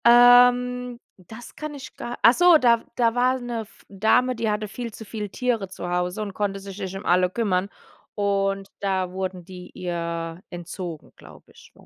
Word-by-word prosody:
Ähm, 245 Hz, 0 st, +6 dB, 0.2 s
das 220 Hz, +6 st, -12 dB
kann 305 Hz, -1 st, -6 dB
ich 270 Hz, -, -10 dB
gar 240 Hz, -, -6 dB
Achso, 335 Hz, +8 st, +7 dB
da 235 Hz, -5 st, +4 dB
w -, -, -19 dB
da 230 Hz, -2 st, +3 dB
war 255 Hz, +2 st, +2 dB
'ne 240 Hz, -2 st, -4 dB
F 220 Hz, 0 st, -15 dB
Dame, 220 Hz, +6 st, +2 dB
die 225 Hz, -1 st, -1 dB
hatte 210 Hz, 0 st, -1 dB
viel 235 Hz, +3 st, -6 dB
zu 220 Hz, -, -10 dB
viele 210 Hz, -1 st, -5 dB
Tiere 230 Hz, -2 st, -1 dB
zu 175 Hz, -1 st, -6 dB
Hause 180 Hz, +3 st, -1 dB
und 200 Hz, -2 st, -6 dB
konnte 200 Hz, -1 st, -2 dB
sich 195 Hz, 0 st, -9 dB
nicht 190 Hz, -1 st, -5 dB
um 195 Hz, -, -9 dB
alle 180 Hz, +1 st, +3 dB
kümmern. 195 Hz, -2 st, 0 dB, 0.5 s
Und 195 Hz, -1 st, 0 dB
da 190 Hz, -2 st, -1 dB
wurden 185 Hz, -1 st, -5 dB
die 180 Hz, -1 st, -10 dB
ihr 170 Hz, -1 st, -4 dB
entzogen, 175 Hz, -2 st, -7 dB
glaube -, -, -16 dB
ich, -, -, -18 dB
205 Hz, 180 wpm, -24 LUFS, 185-240 Hz, 0.5 s, Achso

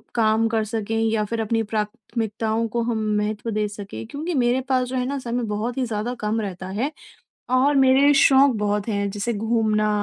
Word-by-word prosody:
काम 225 Hz, -1 st, +3 dB
कर 225 Hz, -1 st, 0 dB
सकें 225 Hz, 0 st, -2 dB
या 220 Hz, -1 st, +1 dB
फिर 225 Hz, +2 st, -2 dB
अपनी 225 Hz, +1 st, 0 dB
प्राथमिकताओं 220 Hz, +1 st, -2 dB
को 235 Hz, +2 st, -2 dB
हम 225 Hz, -2 st, -1 dB
महत्व 210 Hz, +2 st, -2 dB
दे 210 Hz, 0 st, 0 dB
सकें। 200 Hz, -, -8 dB
क्योंकि 320 Hz, +5 st, -4 dB
मेरे 250 Hz, -2 st, +2 dB
पास 255 Hz, -1 st, +2 dB
जो 260 Hz, -, -5 dB
है 250 Hz, -1 st, 0 dB
ना 280 Hz, +2 st, -2 dB
समय 240 Hz, 0 st, -3 dB
बहुत 235 Hz, +4 st, -3 dB
ही 260 Hz, -, +1 dB
ज़्यादा 225 Hz, +2 st, -3 dB
कम 215 Hz, +1 st, -1 dB
रहता 185 Hz, -2 st, -5 dB
है, 230 Hz, +10 st, -2 dB, 0.6 s
और 260 Hz, +3 st, +3 dB
मेरे 270 Hz, +2 st, +5 dB
शौक 275 Hz, 0 st, +6 dB
बहुत 210 Hz, 0 st, -1 dB
हैं, 200 Hz, -2 st, -1 dB
जैसे 210 Hz, +4 st, -2 dB
घूमना 215 Hz, -1 st, +1 dB
225 Hz, 190 wpm, -23 LUFS, 210-250 Hz, 0.6 s, शौक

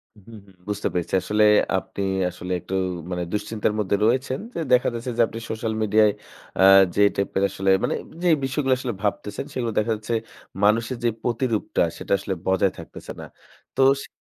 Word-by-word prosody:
হুম, 105 Hz, -3 st, -20 dB, 0.2 s
হুম, 95 Hz, -, -20 dB
বুঝতে 105 Hz, -1 st, -2 dB
পেরেছি, 90 Hz, -2 st, -3 dB
আসলে 105 Hz, +1 st, +1 dB, 0.3 s
আপনি 95 Hz, -, -5 dB, 0.3 s
আসলে 90 Hz, +1 st, -8 dB
একটু 95 Hz, -, -5 dB, 0.4 s
মানে 90 Hz, -1 st, -2 dB
দুশ্চিন্তার 105 Hz, 0 st, -1 dB
মধ্যে 100 Hz, -1 st, +1 dB
রয়েছেন, 130 Hz, +3 st, +1 dB, 0.2 s
যে -, -, -2 dB
দেখা 125 Hz, -, +4 dB
যাচ্ছে 120 Hz, +2 st, -4 dB
যে 120 Hz, -, +4 dB
আপনি 115 Hz, -, -7 dB
social 110 Hz, 0 st, -2 dB
media-য় 110 Hz, 0 st, +4 dB, 0.5 s
আ -, -, +5 dB, 0.3 s
যে -, -, +2 dB
type-এর 100 Hz, 0 st, -1 dB
আসলে, 95 Hz, 0 st, -1 dB
মানে -, -, 0 dB, 0.3 s
যে 180 Hz, -, +3 dB
বিষয়গুলো 135 Hz, 0 st, +1 dB
আসলে 125 Hz, -2 st, -3 dB
ভাবতেছেন, 105 Hz, +3 st, -2 dB
সেগুলো 120 Hz, -3 st, -2 dB
দেখা 110 Hz, +2 st, 0 dB
যাচ্ছে 110 Hz, +2 st, -5 dB, 0.5 s
মানুষের 115 Hz, +4 st, +2 dB
যে 120 Hz, -, +3 dB
প্রতিরূপটা 120 Hz, -2 st, 0 dB
সেটা -, -, -8 dB
আসলে 100 Hz, 0 st, -3 dB
বজায় 95 Hz, 0 st, +2 dB
থাকতেছে -, -, -10 dB
না। -, -, -7 dB, 0.5 s
তো -, -, +3 dB, 0.2 s
সে -, -, -9 dB
110 Hz, 175 wpm, -23 LUFS, 100-120 Hz, 0.5 s, আ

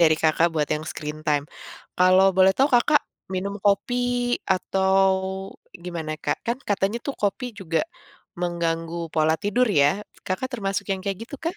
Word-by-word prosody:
dari 160 Hz, -2 st, +6 dB
Kakak 160 Hz, +1 st, +4 dB
buat 150 Hz, -2 st, +1 dB
yang 150 Hz, -, -4 dB
screen 150 Hz, 0 st, -6 dB
time. 145 Hz, -1 st, +2 dB, 0.5 s
Kalau 185 Hz, +1 st, +6 dB
boleh 190 Hz, 0 st, +6 dB
tahu 270 Hz, -, +4 dB
Kakak, 290 Hz, +5 st, +5 dB, 0.4 s
minum 195 Hz, +2 st, -2 dB
kopi 205 Hz, +5 st, +2 dB, 0.5 s
atau 190 Hz, +1 st, +1 dB, 0.9 s
gimana, 165 Hz, -3 st, -4 dB
Kak? -, -, +1 dB
Kan 235 Hz, +1 st, 0 dB
katanya 200 Hz, +2 st, 0 dB
tuh 280 Hz, -, -2 dB
kopi 210 Hz, +5 st, 0 dB
juga 165 Hz, -3 st, 0 dB, 0.6 s
mengganggu 170 Hz, -1 st, -2 dB, 0.2 s
pola 160 Hz, 0 st, +3 dB
tidur 240 Hz, +5 st, +2 dB
ya, 145 Hz, -7 st, +5 dB, 0.4 s
Kakak 185 Hz, +8 st, -2 dB
termasuk 195 Hz, -4 st, -2 dB
yang 195 Hz, -, 0 dB
kayak 195 Hz, -2 st, -2 dB
gitu 285 Hz, -, -9 dB
kah? 335 Hz, +4 st, -3 dB
185 Hz, 155 wpm, -24 LUFS, 165-205 Hz, 0.9 s, dari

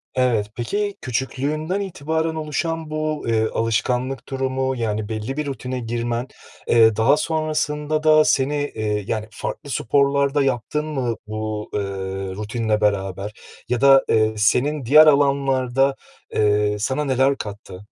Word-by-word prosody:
Evet, 120 Hz, -5 st, +2 dB
peki 205 Hz, -, -2 dB
küçüklüğünden 145 Hz, -, -2 dB
itibaren 160 Hz, -3 st, -2 dB
oluşan 160 Hz, +1 st, -3 dB
bu, 155 Hz, 0 st, -2 dB
eee, 110 Hz, -1 st, +2 dB
alışkanlık 125 Hz, +4 st, -1 dB
durumu, 130 Hz, 0 st, -1 dB
yani, 110 Hz, -2 st, -2 dB
belli 110 Hz, +6 st, -4 dB
bir 150 Hz, -, -1 dB
rutine 130 Hz, -2 st, -4 dB
girmen, 120 Hz, +1 st, -3 dB, 0.4 s
eee, 110 Hz, -2 st, +5 dB
daha 115 Hz, +7 st, +4 dB
sonrasında 155 Hz, -1 st, -1 dB
da 155 Hz, 0 st, +6 dB
seni, 140 Hz, +2 st, +2 dB, 0.2 s
eee, 105 Hz, -2 st, -1 dB
yani, 110 Hz, -1 st, -2 dB
farklı 145 Hz, -, -6 dB
sporlar 140 Hz, +2 st, +1 dB
da 145 Hz, -, +3 dB
yaptın 135 Hz, +4 st, -1 dB
mı 130 Hz, -7 st, -2 dB
bu, 110 Hz, 0 st, -4 dB
eee, 105 Hz, -, 0 dB, 0.6 s
rutinle 105 Hz, +1 st, -1 dB
beraber 100 Hz, 0 st, -1 dB, 0.4 s
ya 125 Hz, 0 st, 0 dB
da, 135 Hz, -1 st, +7 dB
eee, 110 Hz, -1 st, +3 dB
senin 130 Hz, +6 st, +1 dB
diğer 155 Hz, +5 st, +7 dB
alanlarda, 135 Hz, -2 st, +2 dB, 0.4 s
eee, 105 Hz, 0 st, +2 dB
sana 130 Hz, +7 st, -1 dB
neler 135 Hz, 0 st, +2 dB
kattı? 100 Hz, -2 st, -8 dB
130 Hz, 135 wpm, -21 LUFS, 110-150 Hz, 0.6 s, da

